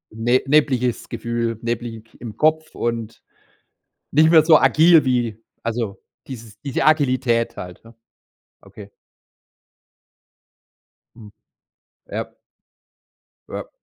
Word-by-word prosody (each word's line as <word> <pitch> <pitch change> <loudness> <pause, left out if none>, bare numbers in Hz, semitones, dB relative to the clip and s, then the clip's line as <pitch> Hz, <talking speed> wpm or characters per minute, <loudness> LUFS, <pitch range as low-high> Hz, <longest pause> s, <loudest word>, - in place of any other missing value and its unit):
ne 120 +3 +2
nebliges 135 -5 +1
Gefühl, 115 -1 -3
neblig 115 -1 -4 0.2
im 110 -3 -8
Kopf 155 0 +1
und 115 -1 -4 0.9
nicht 155 +2 +4
mehr 160 -2 +6
so 160 -2 +7
agil 160 -1 +5
wie 120 -4 -1 0.2
also 115 -4 -3 0.3
dieses 110 -5 -11
diese 135 -1 -2
Agilität 130 -6 +1
halt, 90 -1 -9
ja. 115 0 -16 0.7
Okay. 100 -1 -13 2.3
Hm. 105 -3 -13 0.8
Ja. - - -5 1.2
Ja. - - -7
120 Hz, 95 wpm, -21 LUFS, 115-140 Hz, 2.3 s, so